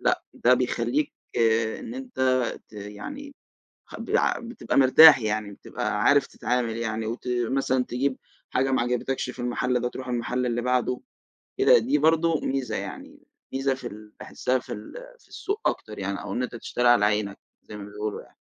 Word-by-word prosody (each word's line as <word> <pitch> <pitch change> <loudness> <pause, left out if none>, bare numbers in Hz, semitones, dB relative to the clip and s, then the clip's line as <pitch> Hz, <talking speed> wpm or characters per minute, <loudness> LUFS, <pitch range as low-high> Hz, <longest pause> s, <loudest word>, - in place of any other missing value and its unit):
لأ - - +1
ده 125 +1 +4
بيخلّيك 125 +3 0 0.7
إن 240 -1 -7
أنت 260 -2 -9 0.5
ت - - -30
يعني 110 - -8 0.5
خ - - -11
ب - - -6 0.4
بتبقى 240 - -3
مرتاح 140 +2 +9
يعني 110 -2 -2
بتبقى - - -3
عارف - - +4
تتعامل 120 -2 -2
يعني، 110 -1 -2
وت 115 +3 -5 0.2
مثلًا 130 0 +1
تجيب 130 +2 -1 0.3
حاجة 135 +1 +1
ما 130 - +2
عجبتكش 125 +2 -1
في 125 - -9
المحل 125 +1 0
ده 125 - -1
تروح 130 +1 -8
المحل 125 +1 -1
اللي 120 -1 -1
بعده، 125 0 0 0.6
كده 425 +5 +6
دي 290 - +1
برضو 165 - +3
ميزة 135 -2 -2
يعني، - - -7 0.3
ميزة 135 0 +1
في 130 -2 -7
ال 105 -1 -11
باحسها 130 0 -1
في - - -8
ال 105 - -9 0.3
في - - -25
السوق 410 +3 -4
أكتر 105 - -6
يعني 100 0 -3
أو - - -5
إن 125 - -1
أنت 125 - -5
تشتري 120 +1 -1
على 115 -4 +5
عينك 105 -1 0 0.2
زي 105 - -10
ما 100 - -8
بيقولوا 105 +1 -5
يعني. - - -21
125 Hz, 175 wpm, -25 LUFS, 110-135 Hz, 0.7 s, مرتاح